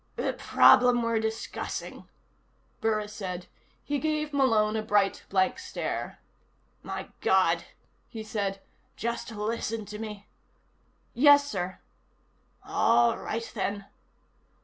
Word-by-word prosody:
"The -, -, -1 dB
problem 245 Hz, -1 st, +5 dB
we're 230 Hz, -1 st, +1 dB
discussing," 220 Hz, 0 st, -5 dB, 0.7 s
Burris 215 Hz, -1 st, -1 dB
said. 180 Hz, -4 st, -5 dB, 0.4 s
He 290 Hz, -1 st, -1 dB
gave 305 Hz, -1 st, -1 dB
Malone 225 Hz, -6 st, +3 dB
a 220 Hz, -, 0 dB
bright, 205 Hz, -3 st, +1 dB
blank 190 Hz, -1 st, +1 dB
stare. -, -, -4 dB, 0.6 s
"My -, -, -6 dB
God," -, -, +3 dB, 0.4 s
he 225 Hz, -2 st, -7 dB
said. 200 Hz, -2 st, -3 dB, 0.3 s
"Just 235 Hz, +3 st, -3 dB
listen 220 Hz, 0 st, -3 dB
to 210 Hz, +1 st, -8 dB
me." 210 Hz, -2 st, -7 dB, 0.9 s
"Yes, 285 Hz, +2 st, +6 dB
sir." 185 Hz, -6 st, -4 dB, 0.8 s
"All 120 Hz, 0 st, +3 dB
right, 230 Hz, +1 st, -4 dB
then." 200 Hz, -1 st, -3 dB
220 Hz, 105 wpm, -28 LUFS, 200-235 Hz, 0.9 s, Yes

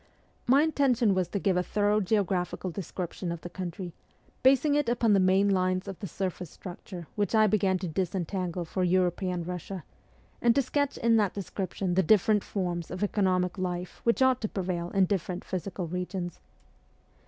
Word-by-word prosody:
My 275 Hz, +4 st, +6 dB
intention 260 Hz, -8 st, +3 dB
was 185 Hz, -2 st, +1 dB
to 200 Hz, -, -3 dB
give 195 Hz, -1 st, +1 dB
a -, -, +3 dB
thorough 205 Hz, +3 st, +1 dB
geographical 190 Hz, -3 st, 0 dB
description 180 Hz, 0 st, -5 dB
of 170 Hz, -1 st, -5 dB
the 175 Hz, -, -8 dB
country, 180 Hz, -1 st, -5 dB, 0.5 s
basing 275 Hz, +3 st, +4 dB
it 290 Hz, -4 st, +2 dB
upon 235 Hz, -2 st, +3 dB
the 200 Hz, -, +5 dB
main 190 Hz, +2 st, +4 dB
lines 185 Hz, -1 st, +1 dB
of 195 Hz, -, -6 dB
the 200 Hz, -, -5 dB
surface 180 Hz, -1 st, -4 dB
structure 180 Hz, 0 st, -9 dB
which 205 Hz, +1 st, 0 dB
I 215 Hz, 0 st, +6 dB
began 195 Hz, -2 st, +2 dB
to 180 Hz, 0 st, -4 dB
disentangle 180 Hz, +1 st, -2 dB
for 185 Hz, +3 st, -2 dB
European 180 Hz, 0 st, +1 dB
Russia; 180 Hz, +1 st, -5 dB, 0.6 s
and 235 Hz, -1 st, +4 dB
to 280 Hz, -, +4 dB
sketch 285 Hz, +2 st, -1 dB
in 230 Hz, 0 st, +3 dB
that 205 Hz, -4 st, +1 dB
description 190 Hz, -1 st, -3 dB
the 190 Hz, -, +4 dB
different 210 Hz, +3 st, +4 dB
forms 175 Hz, -4 st, -3 dB
of 185 Hz, +3 st, -4 dB
economic 185 Hz, -2 st, +1 dB
life 180 Hz, -1 st, -4 dB
which 235 Hz, +3 st, +3 dB
ought 260 Hz, -1 st, +3 dB
to 215 Hz, -, -1 dB
prevail 175 Hz, -3 st, -2 dB
in 195 Hz, 0 st, +3 dB
different 185 Hz, -1 st, -2 dB
physical 185 Hz, 0 st, -4 dB
regions. 180 Hz, +1 st, -4 dB
190 Hz, 175 wpm, -28 LUFS, 180-210 Hz, 0.6 s, My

